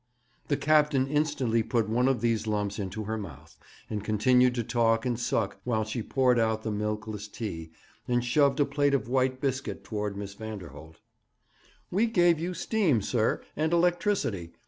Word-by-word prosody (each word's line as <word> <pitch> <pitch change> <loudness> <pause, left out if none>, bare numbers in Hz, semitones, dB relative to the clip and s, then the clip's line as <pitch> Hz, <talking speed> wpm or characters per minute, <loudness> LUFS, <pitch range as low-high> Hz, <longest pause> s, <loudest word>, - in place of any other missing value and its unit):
The 145 - +1
captain 150 -3 +3
instantly 145 -6 +1
put 115 -1 0
one 120 +4 +2
of 130 -4 +1
these 115 -2 0
lumps 105 -1 -1
into 100 +2 -4
her 110 +1 -3
mouth, 85 -10 -10 0.3
and 105 -2 -4
continued 125 +4 +3
to 120 - -1
talk 115 0 +1
and 120 -2 -1
suck 100 -5 -1
while 110 -2 0
she 110 +2 -4
poured 125 +1 +2
out 110 -1 0
the 110 - -2
milkless 105 0 -3
tea, 85 -7 -6 0.4
and 120 0 +1
shoved 140 +3 +3
a 145 - +4
plate 140 0 +1
of 130 - -2
white 130 0 +1
biscuit 130 -1 -3
towards 105 -2 -4
Miss 100 -1 -6
Vanderholt. 90 -8 -9 1.0
'We 210 +6 +2
gave 175 -7 +3
you 175 +2 -3
steam, 170 - +1
sir, 115 -1 0
and 155 +2 0
electricity. 170 - +1
120 Hz, 170 wpm, -28 LUFS, 105-140 Hz, 1.0 s, a